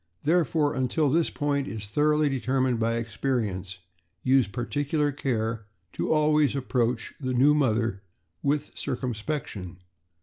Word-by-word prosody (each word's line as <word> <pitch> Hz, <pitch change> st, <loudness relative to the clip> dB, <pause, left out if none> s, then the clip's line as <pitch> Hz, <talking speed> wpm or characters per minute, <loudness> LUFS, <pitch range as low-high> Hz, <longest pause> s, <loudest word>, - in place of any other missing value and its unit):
Therefore, 160 Hz, -2 st, +2 dB
until 130 Hz, +3 st, +1 dB
this 165 Hz, +2 st, +2 dB
point 145 Hz, -1 st, -1 dB
is 110 Hz, -5 st, -5 dB
thoroughly 150 Hz, +7 st, +2 dB
deter 135 Hz, -1 st, 0 dB
mined 130 Hz, -3 st, +1 dB
by 115 Hz, +1 st, +1 dB
experience, 110 Hz, -6 st, -2 dB, 0.5 s
use 130 Hz, -2 st, +4 dB
particular 145 Hz, +6 st, -1 dB
care 115 Hz, -6 st, -2 dB, 0.3 s
to -, -, -2 dB
always 150 Hz, -2 st, +3 dB
approach 125 Hz, -4 st, -1 dB
the 130 Hz, -3 st, -2 dB
new 140 Hz, +4 st, +5 dB
mother 115 Hz, -8 st, +1 dB, 0.4 s
with 145 Hz, +1 st, 0 dB
circumspection. 120 Hz, -, -4 dB
130 Hz, 125 wpm, -27 LUFS, 115-145 Hz, 0.5 s, new